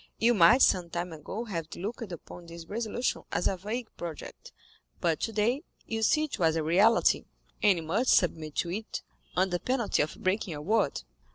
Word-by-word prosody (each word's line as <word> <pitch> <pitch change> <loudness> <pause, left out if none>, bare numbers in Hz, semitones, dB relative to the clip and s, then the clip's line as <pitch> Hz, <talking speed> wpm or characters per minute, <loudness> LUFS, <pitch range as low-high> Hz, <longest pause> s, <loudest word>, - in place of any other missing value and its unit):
You 235 +2 +4
might 220 +6 +6
some 175 -2 +3
time 175 0 -4
ago 190 +8 -5
have 170 -8 -5
looked 215 +2 -5
upon 170 +1 -9
this 170 0 -9
resolution 230 +5 -2
as - - 0
a 195 - +1
vague 220 +6 -4
project, 170 -3 -8 0.5
but 165 -2 +1
today 225 +5 0 0.2
you 225 -1 -3
see 305 +7 +3
it 300 -8 -4
was 165 -2 +3
a 160 - 0
reality, 200 +9 +4 0.4
and 200 -4 +5
you 165 - -4
must 205 +11 0
submit 160 -4 0
to 170 - -1
it 215 +4 -5 0.3
under 180 -1 +2
penalty 250 -2 0
of 150 - -2
breaking 185 -1 0
your 145 - -6
word." 195 - +1
190 Hz, 180 wpm, -29 LUFS, 170-225 Hz, 0.5 s, might